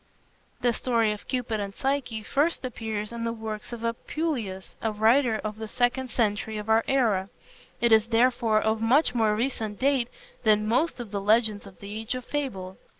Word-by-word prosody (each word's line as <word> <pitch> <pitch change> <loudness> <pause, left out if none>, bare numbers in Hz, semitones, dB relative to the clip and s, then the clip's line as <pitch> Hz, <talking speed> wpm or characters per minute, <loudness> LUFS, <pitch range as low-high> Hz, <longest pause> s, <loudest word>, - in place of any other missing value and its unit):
The 240 -1 +3
story 230 -3 +1
of 210 - -7
Cupid 245 -4 -1
and 200 -1 -4
Psyche 265 -5 -1
first 285 +5 0
appears 220 -3 -4
in 235 0 -5
the 230 - 0
works 220 -1 -6
of 235 -1 -6
Apuleius, 230 - -3
a 220 - 0
writer 225 +3 +3
of 215 0 -4
the 220 - -4
second 245 +3 0
century 215 -1 0
of 210 +1 -6
our 220 +1 +5
era. 215 -8 +2 0.5
It 235 -1 +3
is 220 0 +6
therefore 230 -2 +3
of 220 0 0
much 250 +4 +3
more 220 -3 +2
recent 220 -3 -2
date 270 -3 +2 0.3
than 215 -1 +3
most 255 +7 +1
of 235 -4 -7
the 200 -1 -2
legends 215 0 +2
of 190 - -15
the 205 +2 -6
Age 225 +3 -3
of 255 -1 -6
Fable. 195 -11 -4
225 Hz, 185 wpm, -27 LUFS, 215-250 Hz, 0.5 s, is